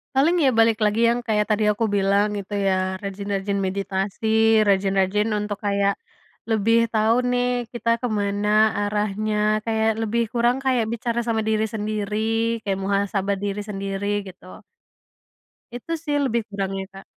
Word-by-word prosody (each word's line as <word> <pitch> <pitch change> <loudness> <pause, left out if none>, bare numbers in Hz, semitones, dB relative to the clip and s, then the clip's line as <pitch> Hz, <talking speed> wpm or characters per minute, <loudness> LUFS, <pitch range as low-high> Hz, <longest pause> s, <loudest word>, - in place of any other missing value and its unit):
Paling 315 +6 +4
ya 270 - +5
balik 225 -1 +4
lagi 210 +2 +1
yang 240 +1 +1
kayak 210 -1 +2
tadi 215 +1 0
aku 225 +2 -1
bilang 200 +1 +2
gitu 200 +1 -7
ya, 185 0 0
rajin-rajin 200 0 -3
meditasi, 195 +2 -3 0.4
rajin-rajin 195 +1 +2
untuk 205 -1 -3
kayak 200 0 +2 0.6
lebih 225 +1 +3 0.2
tahu 220 +1 +3 0.2
nih 245 0 +1 0.3
kita 235 -1 -2
ke 245 - 0
mana 205 +1 -1 0.3
arahnya, 210 +1 -1 0.3
kayak 220 0 +1
lebih 230 +2 0
kurang 240 +2 +2
kayak 250 -4 +2
bicara 235 0 -2
sama 225 -1 +1
diri 220 0 +1
sendiri, 210 -1 -3 0.5
kayak 195 -1 -1
muhasabah 200 0 0
diri 205 0 -2
sendiri 195 0 -4 0.2
gitu. 185 0 -13 1.1
Itu 250 +7 -8
sih 295 -2 -1
lebih 235 -2 0
kurangnya 195 -1 -3
Kak. 195 - -11
205 Hz, 145 wpm, -23 LUFS, 195-225 Hz, 1.1 s, ya